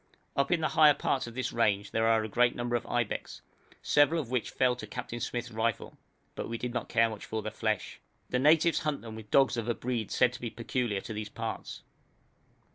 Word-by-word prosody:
Up 140 0 +1
in 170 -2 +2
the 155 - +1
higher 150 -2 +6
parts 130 - -1
of 120 - -9
this 130 - -2
range 105 -3 +1
there 110 0 +2
are 110 -1 +3
a - - -3
great 120 +3 +2
number 120 0 -1
of 120 - -2
ibex, 120 -3 -2 0.4
several 150 +3 +4
of 130 -6 -5
which 125 -3 0
fell 125 -1 +2
to 110 - -7
Captain 120 +3 -6
Smyth's 120 0 -3
rifle, 110 0 -2 0.4
but - - -5
we 115 - -3
did 120 +1 -4
not 125 - -3
care 115 0 +4
much 110 -2 -7
for 110 -1 -4
the 110 - -4
flesh. 110 -1 -2 0.3
The 125 - +1
natives 160 +4 +4
hunt 150 -2 -2
them 110 -1 -8
with 110 -1 -10
dogs 135 -1 +4
of 115 0 -2
a 120 - +1
breed 120 -4 -3
said 125 -1 +3
to 125 - -9
be 120 - -3
peculiar 115 -3 -2
to 115 - -7
these 105 0 -5
parts. - - -6
120 Hz, 225 wpm, -30 LUFS, 110-125 Hz, 0.4 s, higher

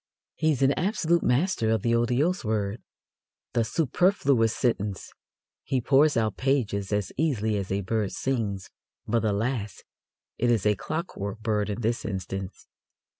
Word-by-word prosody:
He 155 - +2
is 140 -2 0
an 135 - +5
absolute 170 -2 +1
master 125 - +1
of 110 -2 +1
the 115 - +2
otiose 125 +10 +1
word, 105 -1 -1 0.7
the 115 -1 +2
superfluous 140 - +2
sentence. 105 -5 -1 0.5
He 130 - 0
pours 140 +4 +4
out 110 -3 0
pages 110 -8 0
as 105 -1 -1
easily 115 -8 +1
as 100 -2 -3
a 100 +1 0
bird 105 0 -1
sings, 110 -8 -2 0.4
but, 115 +1 +1
alas! 105 0 -1 0.6
it 120 - +2
is 115 -5 +2
a 105 - +5
clockwork 110 - -4
bird 105 -2 0
in 105 +3 -3
this 115 +1 0
instance. 95 -1 -5
115 Hz, 145 wpm, -26 LUFS, 105-135 Hz, 0.7 s, an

